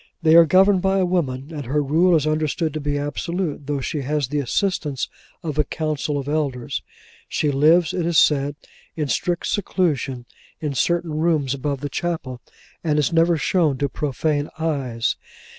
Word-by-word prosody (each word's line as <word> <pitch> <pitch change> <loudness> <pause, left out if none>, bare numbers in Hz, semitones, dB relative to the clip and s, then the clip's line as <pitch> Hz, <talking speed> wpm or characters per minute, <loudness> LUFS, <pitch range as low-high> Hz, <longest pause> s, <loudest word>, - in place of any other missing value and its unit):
They 160 -1 +5
are 165 0 +8
governed 190 +2 +5
by 195 +1 +2
a 190 - +3
woman, 145 -6 -1
and 145 -2 -5
her 145 +3 +1
rule 165 +5 +3
is 155 -2 +2
understood 155 0 0
to 155 - -3
be 145 0 -1
absolute, 150 +1 -3
though 145 -2 -1
she 145 +3 -3
has 145 -1 -1
the 150 +1 -1
assistance 145 - -1 0.4
of 155 -2 -3
a - - +5
council 150 0 -2
of 140 -1 -4
elders. 145 -5 -2 0.5
She 150 - 0
lives, 155 +5 +4
it 170 -2 -1
is 170 -2 +1
said, 145 -1 +3 0.4
in 150 -3 -2
strict 175 +8 -1
seclusion, 145 - -1 0.3
in 150 -3 -2
certain 165 +1 0
rooms 155 -5 +1
above 140 0 -3
the 145 - -2
chapel, 140 -5 -3 0.4
and 155 -3 +1
is 150 +2 +1
never 165 0 +4
shown 155 -4 +1
to 140 +1 -1
profane 145 +2 -1
eyes. 135 -8 -1
150 Hz, 175 wpm, -22 LUFS, 140-165 Hz, 0.5 s, are